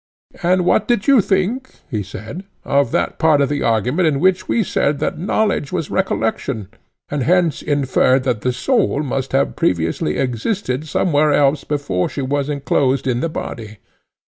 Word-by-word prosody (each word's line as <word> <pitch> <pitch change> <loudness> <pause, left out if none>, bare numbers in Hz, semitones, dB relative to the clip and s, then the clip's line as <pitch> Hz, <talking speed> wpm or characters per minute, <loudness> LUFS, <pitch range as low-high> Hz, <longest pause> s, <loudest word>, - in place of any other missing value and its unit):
And 180 0 +2
what - - +2
did 235 -4 +1
you 275 -5 +6
think, 200 +8 -1 0.2
he 110 -4 -1
said, 110 - -8 0.2
of 140 -3 +2
that - - -1
part 155 -3 +4
of 140 - +2
the 145 0 -1
argument 125 - +1
in 140 -3 +1
which 185 +2 +2
we 230 - +1
said 145 -5 0
that - - -2
knowledge 195 -4 0
was 155 - -3
recollection, 115 - -1 0.4
and 145 -1 -2
hence 170 +3 +2
inferred 135 -2 +2
that 125 -5 -1
the 125 - 0
soul 150 - 0
must 135 -1 -3
have 135 +1 +1
previously 80 -3 0
existed 130 - -2
somewhere 150 -1 +2
else 145 0 +2
before 140 -12 -1
she 140 - -4
was 140 +2 -1
enclosed 140 -2 0
in 125 -2 0
the 165 - -1
body? 110 -8 -6
140 Hz, 170 wpm, -19 LUFS, 125-175 Hz, 0.4 s, you